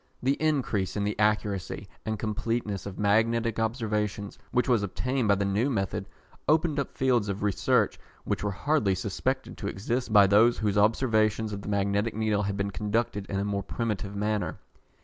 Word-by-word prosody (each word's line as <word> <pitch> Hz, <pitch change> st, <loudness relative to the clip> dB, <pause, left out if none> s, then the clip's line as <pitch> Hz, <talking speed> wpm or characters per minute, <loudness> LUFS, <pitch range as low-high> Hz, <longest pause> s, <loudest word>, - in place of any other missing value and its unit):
The 135 Hz, +2 st, +3 dB
increase 135 Hz, -11 st, 0 dB
in 100 Hz, -, 0 dB
the 105 Hz, +1 st, 0 dB
accuracy 105 Hz, -2 st, 0 dB, 0.2 s
and 110 Hz, 0 st, -1 dB
completeness 105 Hz, -2 st, -2 dB
of 95 Hz, -, -7 dB
magnetic 115 Hz, +2 st, +2 dB
observations 105 Hz, -3 st, -2 dB
which 125 Hz, -2 st, +1 dB
was 120 Hz, -5 st, +3 dB
obtained 125 Hz, +5 st, -1 dB
by 100 Hz, -, +5 dB
the 100 Hz, +1 st, -1 dB
new 105 Hz, +7 st, +1 dB
method, 100 Hz, -4 st, -2 dB, 0.4 s
opened 155 Hz, -1 st, +3 dB
up 140 Hz, -, -4 dB
fields 125 Hz, -6 st, +2 dB
of 100 Hz, +1 st, -3 dB
research 105 Hz, -2 st, +2 dB, 0.2 s
which -, -, -2 dB
were 105 Hz, -, 0 dB
hardly 100 Hz, 0 st, +1 dB
suspected 115 Hz, +8 st, -3 dB
to 100 Hz, -, -3 dB
exist 115 Hz, +5 st, -2 dB
by 105 Hz, -2 st, +8 dB
those 110 Hz, +5 st, +5 dB
whose 105 Hz, -2 st, 0 dB
observations 110 Hz, 0 st, +2 dB
of 100 Hz, -, -5 dB
the 100 Hz, -, -6 dB
magnetic 100 Hz, +2 st, 0 dB
needle 110 Hz, -2 st, +1 dB
had 100 Hz, 0 st, -2 dB
been 100 Hz, 0 st, -1 dB
conducted 105 Hz, -1 st, -1 dB
in 100 Hz, -, -2 dB
a 100 Hz, -, -1 dB
more 100 Hz, -1 st, -1 dB
primitive 105 Hz, -1 st, -3 dB
manner. 105 Hz, 0 st, -1 dB
105 Hz, 175 wpm, -28 LUFS, 100-115 Hz, 0.4 s, by